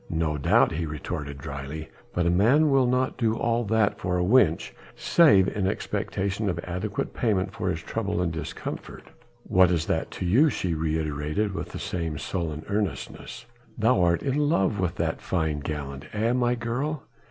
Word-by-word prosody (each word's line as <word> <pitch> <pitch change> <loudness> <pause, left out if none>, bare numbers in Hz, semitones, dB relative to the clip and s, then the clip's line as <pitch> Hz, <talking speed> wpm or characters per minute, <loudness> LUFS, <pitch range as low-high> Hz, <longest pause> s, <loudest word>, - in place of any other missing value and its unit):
"No 80 -2 0
doubt," 70 - +3
he 80 0 -2
retorted 70 -1 -5
dryly, 70 +2 -7 0.2
"but 90 - 0
a 85 - +3
man 130 - +4
will 135 -2 +4
not 130 +1 0
do 115 -2 +2
all 120 +1 +1
that 110 -1 +1
for 90 0 -1
a 90 - +1
wench, 90 -5 +3 0.2
save 100 - +5
in 100 -2 -1
expectation 100 +1 -2
of 85 - -2
adequate 90 +4 -3
payment 100 -4 0
for 95 - -2
his 85 -2 -3
trouble 100 -5 -2
and 90 -2 0
discomfort." 80 - -6 0.4
"What 95 -3 +4
is 85 -2 +1
that 80 -1 -1
to 95 - -3
you?" 130 - +5
she 90 - -2
reiterated, 80 +4 -1
with - - -5
the - - -7
same 85 -4 -3
sullen 80 +1 -4
earnestness. 105 -1 -4 0.3
"Thou 110 -3 +3
art 85 -1 +2
in 140 +1 0
love 100 - +1
with 90 -2 -1
that - - -2
fine 80 -4 -1
gallant, 70 -1 -5
eh, 110 +3 +1
my 125 -1 +2
girl?" 130 +6 -3
95 Hz, 175 wpm, -26 LUFS, 80-110 Hz, 0.4 s, save